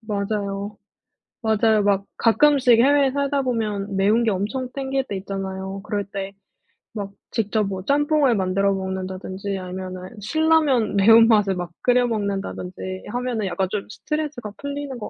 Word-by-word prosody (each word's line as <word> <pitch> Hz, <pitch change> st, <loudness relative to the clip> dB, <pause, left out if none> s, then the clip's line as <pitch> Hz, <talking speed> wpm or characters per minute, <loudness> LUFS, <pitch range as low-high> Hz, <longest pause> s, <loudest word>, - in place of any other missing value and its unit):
맞아요, 205 Hz, -1 st, -3 dB, 0.7 s
맞아요. 220 Hz, -1 st, +3 dB
막 200 Hz, -1 st, +2 dB
가끔씩 255 Hz, 0 st, +4 dB
해외에 280 Hz, +2 st, +4 dB
살다 280 Hz, 0 st, 0 dB
보면 210 Hz, -6 st, -2 dB
매운 210 Hz, +5 st, +3 dB
게 225 Hz, -, +2 dB
엄청 215 Hz, +7 st, -2 dB
땡길 270 Hz, -1 st, -2 dB
때 200 Hz, -, -4 dB
있잖아요. 190 Hz, 0 st, -5 dB
그럴 205 Hz, -1 st, -2 dB
때 195 Hz, 0 st, -6 dB, 0.6 s
막 200 Hz, -1 st, -4 dB, 0.2 s
직접 220 Hz, -1 st, 0 dB
뭐 190 Hz, -1 st, -4 dB
짬뽕을 290 Hz, -1 st, +2 dB
만들어 195 Hz, +1 st, +1 dB
먹는다든지 190 Hz, +1 st, -4 dB
아니면은 185 Hz, 0 st, -7 dB
신라면 295 Hz, -3 st, +2 dB
매운맛을 215 Hz, -1 st, +6 dB
막 175 Hz, -1 st, -5 dB
끓여 245 Hz, 0 st, +3 dB
먹는다든지 195 Hz, -3 st, -4 dB
하면은 245 Hz, -4 st, -2 dB
약간 185 Hz, +1 st, -1 dB
좀 205 Hz, -1 st, -3 dB
스트레스가 295 Hz, -5 st, -4 dB
풀리는 285 Hz, -2 st, -5 dB
것 220 Hz, -, -6 dB
210 Hz, 320 characters per minute, -22 LUFS, 195-250 Hz, 0.7 s, 매운맛을